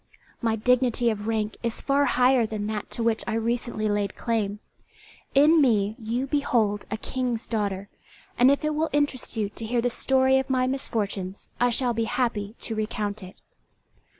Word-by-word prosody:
My 225 -2 +1
dignity 245 +1 +2
of 210 0 -5
rank 220 -1 -1
is 235 -1 -3
far 280 +1 +2
higher 250 -2 +3
than 210 -1 -4
that 210 -1 -4
to 230 - -3
which 225 -1 +1
I - - -1
recently 230 -1 -1
laid 205 -1 -1
claim; 215 -4 -1 0.8
in 305 +3 +6
me 215 -5 +2
you 235 +4 -2
behold 235 -8 +1
a 215 - -2
King's 245 -1 -2
daughter, 200 -3 -2 0.5
and 250 +2 +5
if 280 +2 +2
it 305 - +1
will 315 +2 0
interest 290 -5 0
you 210 -2 +1
to 210 - -8
hear 235 +2 0
the 245 +1 +1
story 265 +1 +3
of 265 - -4
my 255 -1 +2
misfortunes, 205 -7 -3
I 245 - +4
shall 245 0 +1
be 230 0 0
happy 230 -4 -1
to 225 - -4
recount 215 -1 -3
it." 185 0 -10
230 Hz, 180 wpm, -26 LUFS, 215-255 Hz, 0.8 s, in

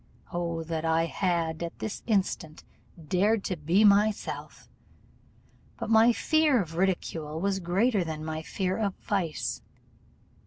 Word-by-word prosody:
O 170 -1 -2
that 160 0 -3
I 165 0 +2
had, 170 -3 -1
at 170 -1 -5
this 220 - -5
instant, 190 -7 -1 0.4
dared 200 +5 +2
to 185 - -2
be 170 +6 +2
myself! 205 +1 +1 1.1
But - - -4
my 225 +2 +6
fear 310 +1 +3
of 165 -5 -4
ridicule 165 -4 -1
was 195 +1 0
greater 195 +4 +1
than 155 -2 -5
my 160 0 -3
fear 185 +3 -2
of 200 -3 -1
vice. 165 - -2
180 Hz, 130 wpm, -28 LUFS, 165-205 Hz, 1.1 s, my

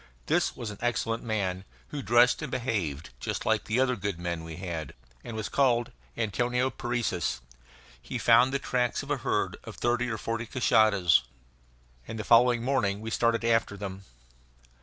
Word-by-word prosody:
This - - +1
was 115 -3 -5
an 105 - -10
excellent 115 -1 -1
man, 95 -5 -2 0.3
who 145 - -4
dressed 120 +2 +4
and 150 - -4
behaved 95 - -2
just - - -3
like - - +1
the 110 +3 0
other 130 -1 +2
good 100 -3 -3
men 85 -1 -3
we 80 -1 -7
had, 85 -4 -5 0.3
and 115 - -6
was 110 - -3
called 125 -3 +2 0.3
Antonio 125 +3 0
Parecis. 120 - -2 0.6
He - - -5
found 130 +2 +5
the 140 - +1
tracks 125 -3 -1
of - - -6
a - - +1
herd - - -1
of - - -9
thirty 120 0 0
or 110 - -2
forty 115 +1 -3
cashadas, 110 -8 +4 0.9
and 110 - -6
the 110 - -3
following 120 +1 +5
morning 120 -7 +1
we 110 +1 -6
started 115 0 +1
after 115 -3 +1
them. 95 -1 -6
115 Hz, 170 wpm, -28 LUFS, 100-120 Hz, 0.9 s, found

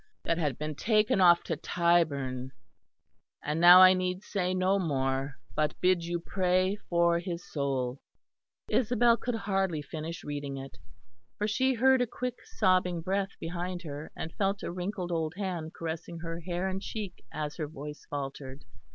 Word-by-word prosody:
that 165 - 0
had 150 -5 -1
been 155 0 -3
taken 210 +3 +2
off 175 -1 +6
to 165 - -2
Tyburn. 140 -7 +1 0.9
And 150 +3 -1
now 180 +2 +10
I 185 0 +9
need 185 +1 -2
say 185 -4 -1
no 185 +2 +2
more, 135 -4 -1 0.2
but 150 -1 0
bid 180 -2 +3
you 175 0 -2
pray 185 +2 +1
for 170 0 +3
his 175 -1 -5
soul." 135 -3 -2 0.7
Isabel 240 0 +3
could 240 0 -3
hardly 195 -7 -1
finish 160 +3 -6
reading 145 -1 -4
it; 135 0 -9 0.6
for 210 - 0
she 260 +4 +2
heard 260 +2 +4
a 245 - +1
quick 250 +2 -5
sobbing 180 -2 +1
breath 195 +3 -2
behind 175 +2 -4
her, 150 -1 -7
and 160 - -6
felt 195 0 -1
a - - -3
wrinkled 180 0 -4
old 160 -1 -1
hand 175 -5 -4
caressing 165 +1 -5
her 165 0 -5
hair 175 +2 -2
and 190 0 -3
cheek 205 -4 -6
as 150 -1 -4
her 155 -3 -2
voice 150 0 -9
faltered. 135 -1 -6
175 Hz, 160 wpm, -29 LUFS, 150-190 Hz, 0.9 s, now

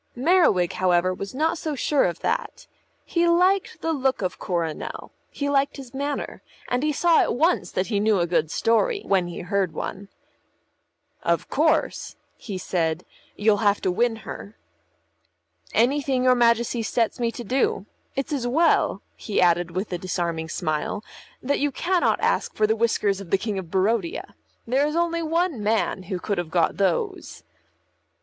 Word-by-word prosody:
Merriwig, 255 - +3
however, 185 0 +2
was 195 +5 -7
not 320 +4 0
so 310 -2 -3
sure 285 +1 +2
of 175 -1 -3
that. - - -2 0.4
He 345 0 +1
liked 365 +3 +2
the 325 - 0
look 265 -6 0
of 180 - -3
Coronel, 170 -4 -3 0.2
he 285 - -3
liked 280 0 +1
his 265 -2 -10
manner, 285 +1 -4 0.3
and 245 +1 0
he 305 +1 +1
saw 335 +3 +3
at - - 0
once 330 +7 +2
that 185 - -1
he 205 -2 -1
knew 210 0 +3
a 170 - +2
good 170 -2 0
story 400 - +1
when 190 -3 +2
he 175 - -6
heard 190 -2 -1
one. 195 +5 -5 1.1
"Of - - 0
course," - - +1 0.2
he 200 -4 -6
said, 170 -2 -1 0.3
"you'll 210 0 +3
have 205 0 +2
to 185 - +1
win 235 +5 +1
her." 100 +4 -8 1.1
"Anything 260 +2 +2
your 255 0 +6
Majesty 235 -1 +2
sets 225 +1 0
me 235 -1 0
to 240 - -6
do. 245 -4 0 0.3
It's 275 +3 -2
as 255 -4 -1
well," 325 +7 +2
he 210 - -2
added 175 -1 +3
with 185 +3 -4
a 175 - -2
disarming 170 -3 -2
smile, 155 +5 -2 0.4
"that 280 +3 0
you 290 0 +1
cannot 355 +6 +1
ask - - 0
for 215 - +3
the 220 +1 +2
whiskers 210 -3 +1
of 190 - -10
the 195 - +3
King 205 0 -3
of 175 -3 -8
Barodia. 190 0 -1 0.3
There 265 +5 +2
is 300 - -3
only 335 0 +1
one 330 -5 0
man 210 -2 0
who 190 - -1
could 200 +1 -2
have 175 -2 -4
got 165 -1 +1
those." 190 -3 -1
220 Hz, 170 wpm, -24 LUFS, 185-280 Hz, 1.1 s, your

